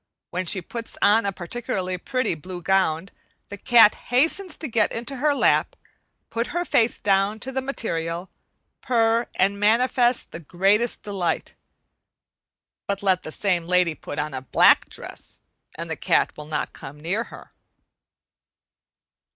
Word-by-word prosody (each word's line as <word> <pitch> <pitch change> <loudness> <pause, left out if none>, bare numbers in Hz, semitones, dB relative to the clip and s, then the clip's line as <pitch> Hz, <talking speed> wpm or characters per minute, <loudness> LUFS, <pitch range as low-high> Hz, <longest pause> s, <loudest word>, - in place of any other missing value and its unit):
When 180 0 -3
she 190 -2 +1
puts 230 +5 -7
on 210 0 +4
a - - +1
particularly 185 -1 -4
pretty 255 +1 -1
blue 175 +3 -8
gown, 190 -2 +1 0.4
the 205 - -7
cat 230 -2 +6 0.2
hastens 320 +8 +1
to 315 - 0
get 225 -4 +1
into 240 +4 -5
her 290 +2 +2
lap, - - +2 0.6
put 230 +1 -1
her 350 - 0
face 230 -6 +2
down 200 +1 +1
to 265 - -3
the 265 0 -2
material, 175 -10 -3 0.5
purr, 230 -1 +2
and 200 +2 +1
manifest 240 +3 +2
the - - -7
greatest 195 +8 +1
delight; 195 -4 -2 1.3
but 200 0 -3
let 190 -2 +2
the 155 - -8
same 175 -2 -1
lady 180 -2 +3
put 145 - -8
on 150 -1 -2
a 130 - -4
black 130 - +4
dress, - - -9 0.4
and - - -6
the - - -3
cat - - +1
will 150 - -9
not 155 - -3
come 145 +2 -11
near 190 +9 -2
her. - - -13
200 Hz, 150 wpm, -24 LUFS, 180-235 Hz, 1.3 s, cat